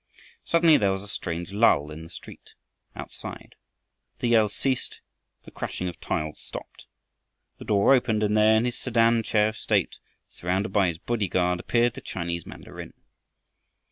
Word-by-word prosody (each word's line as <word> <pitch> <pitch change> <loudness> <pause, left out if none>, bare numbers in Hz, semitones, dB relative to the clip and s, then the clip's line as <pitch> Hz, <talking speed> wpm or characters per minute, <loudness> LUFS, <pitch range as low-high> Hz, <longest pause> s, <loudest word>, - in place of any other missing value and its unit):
Suddenly 165 -2 +5
there 100 -2 +2
was 95 0 -5
a - - -10
strange 85 -2 -5
lull 100 -8 +3
in 80 +1 -8
the 80 - -11
street - - -13 0.4
outside. - - -9 0.6
The 120 - -1
yells 110 -3 +4
ceased, 130 -2 -2 0.4
the - - -13
crashing 90 - -4
of 85 - -6
tiles 75 0 -3
stopped. - - -10 0.7
The - - -9
door 100 +5 +4
opened, 120 -5 +2
and 105 0 +1
there 110 +1 +5
in 115 - +1
his 125 - -1
sedan 115 -1 +3
chair 105 -1 +2
of 110 - -9
state - - 0 0.3
surrounded 95 +4 -2
by 100 -3 +4
his 85 -2 -2
bodyguard, 90 -4 0
appeared 120 +3 +1
the - - -9
Chinese 85 -2 -4
mandarin. - - -10
105 Hz, 160 wpm, -26 LUFS, 90-115 Hz, 0.7 s, Suddenly